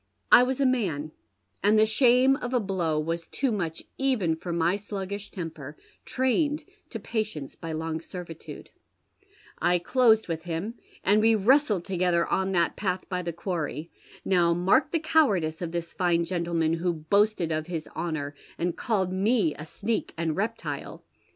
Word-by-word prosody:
I - - +10
was 255 +1 0
a 275 - +3
man, 180 - 0 0.5
and 210 +3 +4
tlie 215 0 +4
shame 255 +1 +5
of 250 -2 -3
a - - +4
blow 180 -7 -1
was 165 +2 -3
too 270 -2 -1
much 170 -6 -3 0.2
even 235 -12 +1
for 170 +2 -6
my 170 +2 +2
sluggish 200 0 -5
temper, 160 -5 -7 0.3
trained 290 +4 0 0.2
to 225 - -5
patience 215 -10 -3
by 165 -1 -7
long 160 0 -3
servitude. 170 -2 -9 0.9
I 175 +1 +3
closed 220 +4 +3
with 165 -2 -3
him, 175 +6 -3 0.3
and 205 +3 +4
we 225 +1 +5
wiestled 215 - +3
together 180 -2 +1
on 190 0 0
that 170 -2 +2
path 185 -2 -2
by 180 -1 -1
the 170 -1 -3
quarry. 165 -2 -4 0.3
Now 175 -3 +3
mark 180 +3 +3
the 335 - +1
cowardice 210 - +2
of 170 -2 -3
tins 170 0 -4
fine 170 -2 +1
gentleman, 170 -2 0
who 170 +1 0
boasted 175 +2 +1
of 155 0 -2
his 165 -3 -4
honour, 155 -4 -3 0.2
and 175 0 -1
called 190 -6 -1
me 195 -3 +2
a 150 - -9
sneak 220 +7 -3
and 160 -2 -1
reptile 220 +5 -4
180 Hz, 165 wpm, -27 LUFS, 165-220 Hz, 0.9 s, I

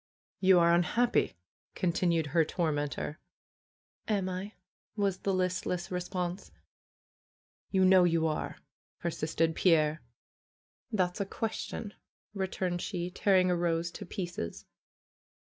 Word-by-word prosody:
"You 190 -1 +6
are 170 0 +5
unhappy!" 175 - +2 0.4
continued 170 -2 +1
her 165 -2 +5
tormentor. 150 -1 -2 0.9
"Am 200 -4 0
I?" 185 +3 -5 0.4
was 200 -3 0
the 195 - 0
listless 185 0 -1
response. 180 0 -3 1.2
"You 190 -1 +3
know 185 -1 +7
you 165 -2 +3
are!" 155 -1 -2 0.4
persisted 165 -1 0
Pierre. 155 -3 +3 0.9
^40 215 - -1
FAITH 180 -2 +3
^^Thafs - - -9
a 200 - 0
question!" 220 0 -4 0.4
returned 190 -2 -2
she, 180 -2 -3
tearing 185 -1 +3
a - - +3
rose 170 0 0
to - - -8
pieces. 175 - -5
180 Hz, 115 wpm, -31 LUFS, 170-190 Hz, 1.2 s, know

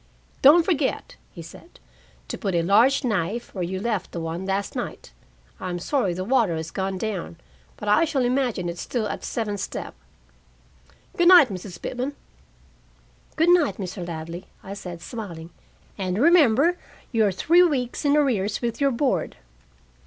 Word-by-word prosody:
"Don't 320 +5 +7
forget," 305 -8 -1 0.2
he 170 - -10
said, 255 - -14 0.5
"to - - -4
put 195 -5 -3
a 170 - +2
large 230 +11 +4
knife 215 0 -2
where 185 - -3
you 185 +2 -3
left 215 -2 -2
the 170 - -5
one 165 +3 -4
last 195 0 -2
night. - - -6 0.5
I'm 180 -1 -4
sorry 190 - -1
the 185 - -3
water 220 -5 +2
has 160 0 -5
gone 190 0 -3
down, 190 -4 -4 0.4
but 210 - -7
I 210 +11 +4
shall 280 -6 0
imagine 245 -7 0
it 170 0 -5
still 235 -4 -2
at - - -4
the - - -6
seventh 210 -3 -3
step. - - -5 1.2
Good 345 - +3
night, 350 -8 +8
Mrs. 180 -2 -7
Pitman." 260 +3 -4 1.2
"Good 325 +2 +3
night, 350 -4 +4
Mr. 185 -3 -6
Ladley," 170 +2 -7 0.2
I 195 - -7
said, 175 -4 -8
smiling, 175 -8 -7 0.5
"and 185 -1 -2
remember, 315 +2 +4 0.3
you 225 -3 +2
are - - +1
three 335 - +4
weeks 270 -8 0
in 290 0 +3
arrears 215 -9 +1
with 235 +1 -3
your 280 - +4
board." 235 - -1
210 Hz, 165 wpm, -24 LUFS, 180-270 Hz, 1.2 s, night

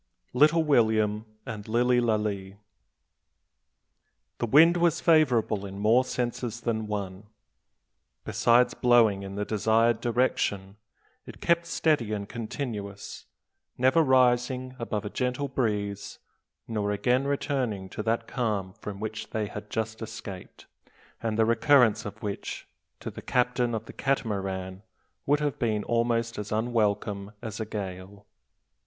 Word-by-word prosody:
LITTLE 155 +5 +5
WILLIAM 110 -6 +2 0.2
AND 110 -5 -7
LILLY 120 +2 +3
LALEE. 105 -4 -1 1.8
The 120 - -1
wind 165 +8 +6
was 170 -1 +2
favourable 125 - +3
in 100 -1 -7
more 110 +5 +4
senses 120 -2 -3
than 110 -2 -2
one. 100 -1 -5 1.0
Besides 120 +1 +3
blowing 115 -5 +4
in 100 0 -7
the 105 0 -2
desired 110 +2 +2
direction, 105 -5 0 0.5
it - - -10
kept 170 0 +1
steady 150 -10 +1
and 100 -1 -4
continuous, 110 -4 -6 0.5
never 130 +6 +4
rising 130 -1 +2
above 110 -3 -3
a - - -3
gentle 125 +2 -1
breeze, 105 -6 -2 0.5
nor 105 -3 -2
again 125 +6 +1
returning 130 -8 -1
to 105 - -5
that 115 +1 0
calm 105 -8 -2
from 100 0 -8
which 110 0 -5
they 110 -1 -2
had 105 +1 -8
just 110 0 -3
escaped, 100 -4 -8 0.6
and 110 -1 -2
the 110 - +4
recurrence 115 0 +4
of 105 +1 -8
which, 100 -1 -5 0.3
to - - -5
the - - -9
captain 125 -1 +1
of 110 - -4
the - - -11
Catamaran, 95 -8 -2 0.5
would 145 +1 +3
have 145 -2 -1
been 110 -3 0
almost 115 -1 0
as 105 0 -6
unwelcome 105 -3 -1
as 110 -2 -5
a 110 - -2
gale. 100 -1 -7
110 Hz, 130 wpm, -27 LUFS, 105-125 Hz, 1.8 s, wind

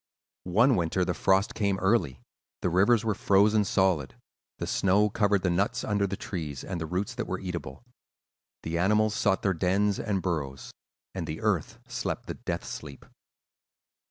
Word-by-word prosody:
"One 115 +8 +4
winter 90 +1 0
the - - -1
frost 95 +1 +2
came 100 -2 0
early; 95 - +1 0.4
the 90 - +1
rivers 105 +6 +3
were 110 - +2
frozen 105 +2 +3
solid; 95 -8 +1 0.4
the - - -3
snow 100 +2 +2
covered 100 -2 +2
the 90 - +2
nuts 100 +8 0
under 100 -1 0
the 100 - -4
trees 75 - -5
and 90 -3 -5
the 80 - -3
roots 95 +9 -2
that 120 -2 -4
were 95 - -3
eatable. 85 - -6 0.8
The 85 +1 -2
animals 105 +3 +3
sought 95 -2 +1
their 95 - +2
dens 95 +3 +1
and 105 -4 -1
burrows, 70 -8 -3 0.4
and - - -4
the - - -5
earth - - 0
slept - - -3
the - - -4
death - - -4
sleep. 70 -2 -8
95 Hz, 165 wpm, -28 LUFS, 85-105 Hz, 0.8 s, One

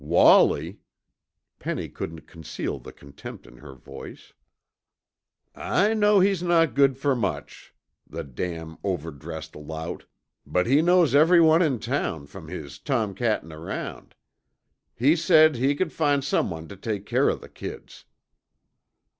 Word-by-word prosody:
"Wallie!" 85 +2 +4 0.8
Penny - - -4
couldn't 80 -1 -7
conceal 80 -4 -6
the - - -11
contempt 70 0 -12
in 60 -1 -16
her 70 -2 -12
voice. 65 - -12 1.2
"I 210 +3 +1
know 210 -2 +4
he's 190 -2 +2
not 165 -6 +2
good 135 0 +3
fer 140 0 +1
much, 115 -7 -5 0.3
the 85 - -6
damn 80 +3 -6
overdressed 80 -4 -5
lout, 80 +3 -7 0.4
but 90 - 0
he 140 +5 +4
knows 175 -4 +4
everyone 160 +2 +6
in 150 -8 +2
town 70 -8 -3
from 70 - -12
his 70 -1 -8
tomcattin' 110 - -1
around. 80 +1 -7 0.8
He 140 +7 +3
said 155 -4 +5
he 135 +4 +1
c'd 175 -2 -1
find 145 -3 +1
someone 80 - -1
tuh 100 - -11
take 105 0 -4
care - - +2
of - - -2
the - - -12
kids." - - -10
110 Hz, 130 wpm, -25 LUFS, -, 1.2 s, everyone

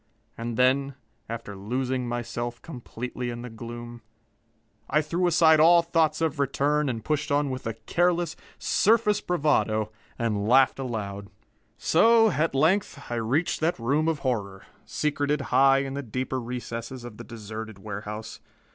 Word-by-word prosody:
And 115 0 -4
then, 135 +2 +2 0.3
after 115 -3 -6
losing 125 +5 -2
myself 120 0 -4
completely 125 -3 -6
in 120 0 -6
the 125 - -7
gloom, 120 +1 -8 0.9
I 150 - +3
threw 170 +4 0
aside 160 -2 +5
all 170 +2 +7
thoughts 165 -2 +1
of 160 -2 0
return 145 +1 +1
and 115 -3 -4
pushed 150 0 -1
on 145 -1 +2
with 130 -2 -5
a 115 - -3
careless, 175 +5 0 0.2
surface 210 -1 +2
bravado, 125 -10 +1 0.3
and 105 -3 -1
laughed 130 +2 +4
aloud. 100 -6 -4 0.5
So, 225 +5 +5
at 155 -1 0
length, 155 -2 +1
I 120 - -1
reached 125 +10 0
that 165 +2 +1
room 140 +7 +1
of 160 -3 0
horror, 100 -6 -2 0.2
secreted 150 0 -1
high 135 +1 +5
in 135 -1 -5
the 140 - -3
deeper 130 +1 -3
recesses 120 0 -6
of 120 -3 -9
the - - -8
deserted 110 -2 -8
warehouse. 105 +2 -7
130 Hz, 145 wpm, -26 LUFS, 115-155 Hz, 0.9 s, all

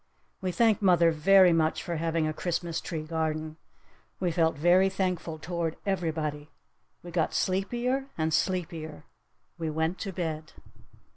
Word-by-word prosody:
We 185 -1 -1
thanked 220 +3 +3
mother 175 -4 +5
very 185 +3 +6
much 160 -1 +1
for 170 -2 -3
having 165 0 0
a 155 - -2
Christmas 170 0 -2
tree 160 -3 -4
garden! 155 -1 -3 0.6
We 180 -2 0
felt 160 -1 +2
very 180 +5 +4
thankful 180 -4 -2
toward 165 0 -3
everybody! 155 -6 -2 0.5
We 175 - -9
got 165 -2 0
sleepier 240 +8 0
and 160 0 0
sleepier! 165 - -2 0.6
We 165 -1 -2
went 160 +3 -1
to 195 - -4
bed! 160 -4 -4
165 Hz, 140 wpm, -28 LUFS, 160-185 Hz, 0.6 s, very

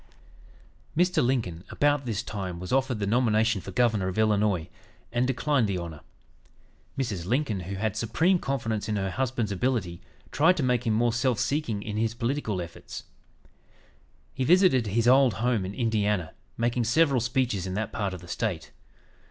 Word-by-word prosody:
'" - - -24
Mr. 180 -2 +3
Lincoln, 110 -10 -1
about 145 -2 +1
this 110 -1 -2
time, 95 -6 -5
was 90 +7 -5
offered 135 -2 +1
the 100 - -2
nomination 110 -1 +2
for - - -9
Governor 110 -6 +1
of 95 - -4
Illinois, 105 -5 +2 0.4
and 120 +1 +1
declined 135 -2 +1
the 100 -2 -1
honor. 85 -3 -6 1.0
Mrs. 105 -10 -3
Lincoln, 120 -3 0
who 95 +2 -5
had 105 +1 -2
supreme 160 - +2
confidence 115 -7 -2
in 105 - 0
her 95 -2 -1
husband's 120 -1 -1
ability, 100 -5 -1 0.3
tried 165 +6 +4
to 150 - 0
make 125 -1 +1
him 110 - +2
more 120 +1 +2
self 125 0 +1
seeking 120 -6 -1
in 105 -1 -4
his 115 +1 0
political 115 -6 -2
efforts. 85 -1 -9 1.3
He 130 - -2
visited 170 - +4
his 115 +3 +1
old 130 -3 +5
home 115 -3 0
in 100 - -7
Indiana, 105 -7 0 0.2
making 120 0 0
several 135 +1 +3
speeches 120 -6 0
in 95 - -4
that 110 +1 -2
part 100 -3 -2
of 90 - -10
the 90 - -12
State. 90 -1 -3
115 Hz, 170 wpm, -27 LUFS, 100-130 Hz, 1.3 s, old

